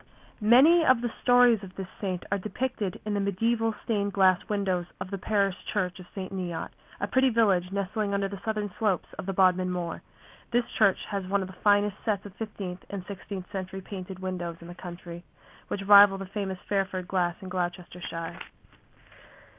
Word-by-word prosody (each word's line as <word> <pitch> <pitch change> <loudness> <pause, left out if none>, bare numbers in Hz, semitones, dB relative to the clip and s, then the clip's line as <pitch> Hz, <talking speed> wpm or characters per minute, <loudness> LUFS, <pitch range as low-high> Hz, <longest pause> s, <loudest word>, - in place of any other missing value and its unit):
Many 270 +11 +7
of 255 -5 +4
the 240 -2 -2
stories 245 -3 +5
of 190 -2 -10
this 195 - -4 0.2
saint 185 -3 -2
are 200 - +1
depicted 210 -1 -3
in 210 - -1
the 205 - +1
mediæval 225 +3 +1
stained 205 -3 0
glass 190 -2 +5
windows 190 -4 0
of 185 - -6
the 195 - -3
parish 200 -1 +1 0.2
church 185 -3 -1
of 180 - -11
St. 190 -1 -5
Neot, 175 -3 -3 0.3
a - - 0
pretty 260 +6 +3
village 195 -6 +2
nestling 200 +1 -1
under 200 0 +1
the 195 -1 -8
southern 215 -2 -2
slopes 210 -6 +1
of - - -5
the 195 - -1
Bodmin 185 -1 +3
Moor. 175 -2 -3 0.5
This 240 0 +2
church 200 -4 +4
has 195 -2 -2
one 200 +1 +1
of - - -6
the 190 - -11
finest 205 0 +4
sets 210 -3 -1
of 200 - -9
fifteenth 195 -4 -6
and 195 -2 -5
sixteenth 195 -1 -6
century 190 -1 -5
painted 190 -1 -7
windows 180 -3 -4
in 170 - -11
the - - -7
country, 175 -1 -9 0.4
which 195 - -3
rival 200 -1 +8
the 195 - -5
famous 190 -1 -4
Fairford 190 -2 -1
glass 175 -2 +1
in 190 -2 -8
Gloucestershire. 175 -2 -4
195 Hz, 185 wpm, -28 LUFS, 185-210 Hz, 0.5 s, rival